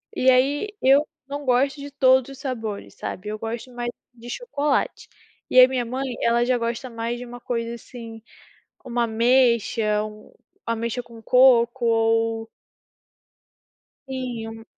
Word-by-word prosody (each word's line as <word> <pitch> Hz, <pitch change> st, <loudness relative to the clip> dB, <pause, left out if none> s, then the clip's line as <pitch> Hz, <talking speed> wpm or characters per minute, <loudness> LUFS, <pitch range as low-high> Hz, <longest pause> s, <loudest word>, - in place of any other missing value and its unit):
E 260 Hz, 0 st, +4 dB
aí, 280 Hz, +10 st, +2 dB
eu 275 Hz, +3 st, +5 dB, 0.2 s
não 285 Hz, +1 st, -5 dB
gosto 265 Hz, +3 st, +2 dB
de 285 Hz, 0 st, -8 dB
todos 260 Hz, -1 st, +3 dB
os 270 Hz, -, -11 dB
sabores, 225 Hz, -7 st, -5 dB
sabe, 190 Hz, +3 st, -6 dB
eu 215 Hz, -, -4 dB
gosto 230 Hz, +3 st, -6 dB
mais 240 Hz, 0 st, -3 dB, 0.2 s
de 240 Hz, 0 st, -12 dB
chocolate. 295 Hz, -, -1 dB, 0.4 s
E 255 Hz, -, +6 dB
aí 255 Hz, -, +10 dB
minha 255 Hz, -2 st, -1 dB
mãe, 255 Hz, +1 st, -3 dB
ela 235 Hz, +1 st, +3 dB
já 250 Hz, 0 st, +2 dB
gosta 235 Hz, +2 st, -3 dB
mais 230 Hz, +1 st, -4 dB
de 245 Hz, -, -7 dB
uma 245 Hz, 0 st, -9 dB
coisa, 235 Hz, -1 st, -3 dB
assim, 230 Hz, -1 st, -10 dB, 0.6 s
como 245 Hz, -2 st, -4 dB
ameixa, 230 Hz, -2 st, +2 dB
um 215 Hz, 0 st, -10 dB, 0.3 s
ameixa 230 Hz, +1 st, -2 dB
com 230 Hz, -1 st, -14 dB
coco 245 Hz, 0 st, +4 dB
ou 225 Hz, 0 st, +1 dB, 1.6 s
Sim 250 Hz, -4 st, -4 dB
um 225 Hz, 0 st, -10 dB
240 Hz, 145 wpm, -23 LUFS, 230-260 Hz, 1.6 s, aí